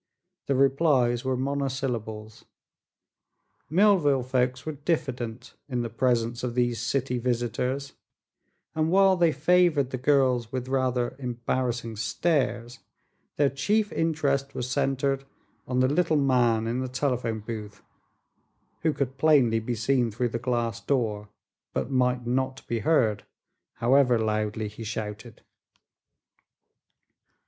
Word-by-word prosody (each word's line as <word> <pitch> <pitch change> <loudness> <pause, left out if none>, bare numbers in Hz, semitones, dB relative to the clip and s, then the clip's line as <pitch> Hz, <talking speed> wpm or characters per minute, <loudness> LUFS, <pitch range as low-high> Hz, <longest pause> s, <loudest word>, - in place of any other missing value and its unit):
The 140 - +1
replies 135 -3 +3
were 130 -1 -1
monosyllables. 130 -6 -3 1.2
Millville 165 -7 +4
folks 125 0 -1
were 155 - -2
diffident 130 -6 -3 0.2
in 125 -2 -1
the 115 - -5
presence 120 0 0
of 120 -1 -3
these 120 -2 +1
city 125 0 -1
visitors 125 +3 -2 0.8
and 155 0 0
while 195 +1 +5
they 170 -3 +3
favored 155 -2 +3
the 130 - -3
girls 130 -4 +2
with 130 -1 -4
rather 130 -2 0
embarrassing 120 -2 -2
stares, 120 0 -1 0.6
their 145 -2 +2
chief 210 +10 0
interest 140 -4 0
was 125 - -3
centered 135 +1 0 0.4
on 125 0 +1
the 130 - +4
little 155 +2 +2
man 120 -5 +2
in 120 +2 -1
the 130 - -2
telephone 125 -4 -1
booth, 105 -2 -8 1.0
who 160 -2 +1
could 135 -1 -3
plainly 135 -7 +4
be 120 +2 -3
seen 120 +2 +1
through 120 +3 -1
the 115 - -3
glass 115 -2 -2
door 110 -6 -1 0.4
but 130 - -2
might 125 -1 +1
not 130 +2 -2
be 115 - -1
heard, 110 -8 +2 0.5
however 125 0 +3
loudly 110 0 -1
he 105 +2 -9
shouted. 110 +1 -6
125 Hz, 120 wpm, -26 LUFS, 115-140 Hz, 1.2 s, while